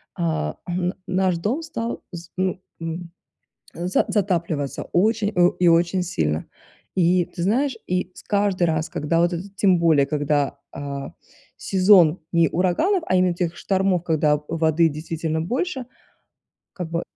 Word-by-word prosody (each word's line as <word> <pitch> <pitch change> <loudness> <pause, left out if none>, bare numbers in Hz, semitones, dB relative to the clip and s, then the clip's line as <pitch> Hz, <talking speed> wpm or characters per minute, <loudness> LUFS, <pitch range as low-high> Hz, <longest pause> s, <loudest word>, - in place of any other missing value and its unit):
а, 75 -2 -1
м, 180 +1 -1
наш 185 -1 +1
дом 220 - -1
стал 235 -7 -4
з 170 -2 -9
ну, 185 0 0 0.2
м, 165 +1 -5 0.6
за 175 +2 0
затапливаться 170 -8 -1
очень, 215 +3 +2
о 175 0 +5
и 180 - +3
очень 170 +2 +3
сильно. 80 - -1 0.5
И 180 0 +3
ты 175 - -7
знаешь, 245 +7 +1
и 180 0 -1
с - - -12
каждый 200 -3 +1
раз, 160 0 -1
когда 165 -1 0
вот 175 +1 +2
этот 190 +3 -6
тем 190 -3 +4
более, 160 -4 +4
когда, 145 -1 0
а, 140 -1 -6 0.4
сезон 185 -3 +4
не 170 -2 +4
ураганов, 190 - +1
а 185 - +2
именно 180 -1 +3
тех 175 -1 -2
штормов, 190 -3 0
когда 150 -3 +2
воды 165 0 +2
действительно 160 +1 -3
больше, 255 - -2 0.9
как 175 -3 -6
бы 170 0 -1
175 Hz, 145 wpm, -23 LUFS, 160-190 Hz, 0.9 s, о